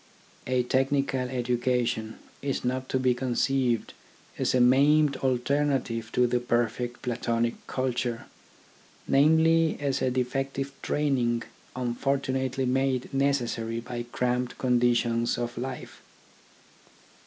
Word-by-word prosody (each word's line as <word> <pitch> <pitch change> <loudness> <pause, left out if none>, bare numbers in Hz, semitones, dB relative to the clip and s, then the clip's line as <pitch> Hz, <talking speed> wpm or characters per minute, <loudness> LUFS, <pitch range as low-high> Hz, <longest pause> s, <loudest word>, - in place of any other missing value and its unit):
A 130 -1 +2
technical 135 0 0
education 120 -2 -1 0.2
is 140 -2 -2
not 130 +1 -2
to - - +1
be 130 -1 +2
conceived 125 -1 0 0.5
as - - +1
a - - +4
maimed 140 +4 +5
alternative 130 -3 0
to 125 - +4
the 120 0 +1
perfect 120 0 -1
Platonic 115 -1 0
culture: 125 -2 -2 0.8
namely, 160 +3 +4
as 140 -1 -1
a 130 - +2
defective 135 +2 -2
training 125 -5 0 0.3
unfortu 130 +2 -1
nately 130 0 -1
made 130 0 0
necessary 120 -5 0
by 120 0 -6
cramped 125 0 -1
conditions 120 -2 +2
of 120 0 -3
life. 125 +1 -6
125 Hz, 110 wpm, -27 LUFS, 120-135 Hz, 0.8 s, maimed